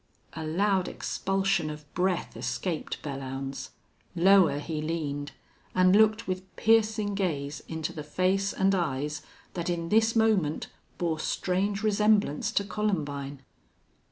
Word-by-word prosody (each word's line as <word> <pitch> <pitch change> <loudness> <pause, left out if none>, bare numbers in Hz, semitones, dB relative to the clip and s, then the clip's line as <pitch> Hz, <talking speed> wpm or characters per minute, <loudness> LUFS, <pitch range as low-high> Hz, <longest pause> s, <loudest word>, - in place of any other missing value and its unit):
A 160 - -5
loud 185 +4 +1
expulsion 195 -4 0
of 150 0 -8
breath 185 0 0
escaped 125 +8 -3
Belllounds. 135 -1 -5 0.5
Lower 180 -3 +5
he 155 +1 -3
leaned, 150 -3 -3 0.4
and 185 +1 +5
looked 220 +1 +4
with 185 0 -5
piercing 215 -2 +3
gaze 150 -7 -2
into 160 -1 -4
the 155 - -6
face 185 +6 +1
and 195 +1 +2
eyes 150 -4 -1 0.3
that 175 -1 -3
in 170 -1 -2
this 225 +2 +3
moment 210 -9 +2 0.3
bore 165 -3 -1
strange 195 +5 -1
resemblance 210 -6 +2
to 200 - +2
Columbine. 145 -10 -2
180 Hz, 125 wpm, -28 LUFS, 150-200 Hz, 0.5 s, Lower